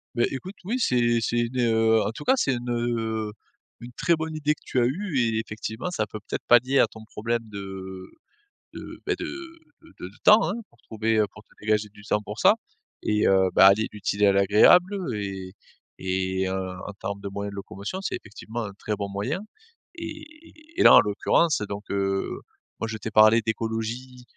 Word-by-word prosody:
Beh, 120 - +3
écoute 180 +9 -6
oui 240 +7 -1
c'est 120 - +2
c'est 120 +2 -1
une, 120 +2 -1
heu 110 -2 +3
en 105 - -1
tout 115 - -9
cas 260 - +4
c'est 140 - +1
une, 120 0 -5
heu, 115 -2 -1 0.5
une 120 +1 -10
très 170 +3 +2
bonne 160 0 -4
idée 150 0 0
que - - -29
tu 130 - 0
as 120 - +3
eue 165 0 -2
et 115 -2 +1
effectivement 110 - -5
ça 110 -11 -1
peut 110 - -7
peut-être - - -4
palier 125 +3 +5
à - - +5
ton 110 - -13
problème 115 +2 -2
de 95 -3 -8 0.7
de, - - -9
beh, - - 0
de - - -3
de 330 -2 -11
de - - -6
de 95 - -16
temps, 215 +1 +8
hein. - - -1 0.2
Pour 120 - -29
trouver, 110 0 -1
heu 105 - +4
pour 110 - -14
te - - -44
dégager 105 0 0
du 105 0 -17
temps 105 0 0
pour - - -8
ça - - +6 0.5
et 105 0 +2
heu, 95 -1 +4
ben - - +7
allier 100 +3 +5
l'utile 105 0 -2
à 100 - +6
l'agréable 105 - +5 0.2
et 95 -3 -5 0.5
et 95 0 -1
heu, 95 - -2 0.3
en 105 - -6
termes 100 0 -5
de 100 - -6
moyens 100 +1 -5
de - - -9
locomotion 100 - -6
c'est 195 - -2
effectivement 110 +1 -7
un 105 -2 -6
très 105 - -2
bon 100 0 -4
moyen 105 - -2 0.6
et 325 -2 -7
et 310 +2 -15
et - - +5
là - - +9
en - - +10
l'occurrence 105 +8 +1
donc, 100 +1 -6
heu, 95 -1 -1 0.4
moi 115 - -2
je 110 - -4
t'ai 110 +1 -6
parlé 110 +2 +6
d'écologie, 115 +3 -4
110 Hz, 205 wpm, -25 LUFS, 100-130 Hz, 0.7 s, en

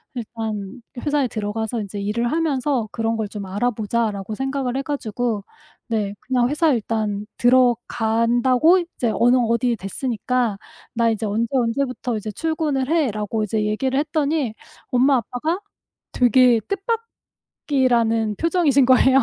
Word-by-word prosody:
일단 220 -2 -5 0.2
회사에 290 -3 +2
들어가서 220 +1 -3
인제 205 0 -6
'일을 235 +4 -1
하면서 285 -7 0
그런 225 0 -1
걸 220 -2 -2
좀 205 -1 -6
알아보자.'라고 215 0 -1
생각을 270 0 -2
해 - - 0
가지고 245 -6 -2 0.4
네 215 -4 -1
그냥 250 -1 +1
회사에 300 +1 +2
일단 210 -2 -2
들어간다고 245 +4 +3
"이제 335 -9 -2
어느 245 +2 +4
어디에 235 0 +1
됐으니까 230 +1 -2 0.4
나 230 0 +3
이제 220 0 -2
언제 215 +3 0
언제부터 250 -1 -1 0.2
출근을 310 -4 -1
해."라고 220 -9 0
이제 215 +1 -1
얘기를 260 +6 0
했더니 295 -5 0 0.4
엄마 260 +2 +4
아빠가 250 - -2 0.5
되게 250 -1 +5 1.1
뜻밖이라는 230 -6 +2
표정이신 330 -6 +3
거예요. 260 +1 +5
240 Hz, 310 characters per minute, -22 LUFS, 220-265 Hz, 1.1 s, 되게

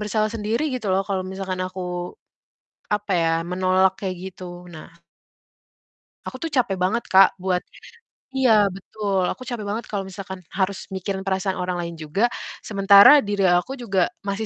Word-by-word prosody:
bersalah 215 +1 0
sendiri 225 +4 -1
gitu 220 -5 -3
loh 190 - +3
kalau 190 -1 -1
misalkan 190 -1 -5
aku 185 0 -6 1.1
apa 210 0 -2
ya, 165 -1 +2
menolak 185 +1 +2
kayak 190 -2 -3 0.2
gitu. 180 -1 -10
Nah 155 - -10 1.4
aku - - -5
tuh - - -17
capek 240 -8 +1
banget, 190 +6 0
Kak, 190 0 +6
buat 180 -1 0 0.7
iya, 220 -6 +4
betul, 195 0 -2
aku 255 - -3
capek 240 -4 -5
banget 225 +3 -3
kalau 195 -2 -3
misalkan 190 -1 -8
harus 190 0 -1
mikirin 190 +1 -4
perasaan 190 0 -1
orang 180 -1 -2
lain 170 0 -5
juga, 165 +10 0 0.3
sementara 200 +6 +7
diri 205 -1 -1
aku 175 +9 +1
juga 200 -9 0 0.2
masih 200 +1 -3
195 Hz, 155 wpm, -23 LUFS, 185-210 Hz, 1.4 s, sementara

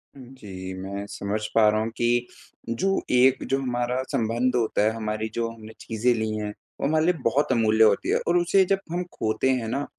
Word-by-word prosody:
जी, 105 -8 -9
मैं 100 +2 -6
समझ 100 +1 -3 0.2
पा 110 -1 +6
रहा 110 0 +1
हूँ 110 - -2
कि, 120 +1 +1 0.4
जो 190 +12 0
एक 125 +1 +4
जो 135 0 +1
हमारा 125 0 -1
संबंध 125 -1 0
होता 115 -3 +1
है, 110 - +3
हमारी 110 0 -3
जो 115 -1 -1
हमने 110 -1 -12
चीज़ें 115 +2 0
ली 110 -1 -2
हैं, 105 -1 -3 0.3
वो - - +1
हमारे 155 +1 +2
लिए 180 - +4
बहुत 135 +5 +1
अमूल्य 110 -2 +4
होती 105 -2 +3
है - - +3
और 175 +1 +3
उसे 175 +3 +4
जब 195 +1 +1
हम 175 +1 -1
खोते 110 +4 0
हैं 125 -3 0
ना, 140 +5 -2
115 Hz, 205 wpm, -25 LUFS, 110-130 Hz, 0.4 s, पा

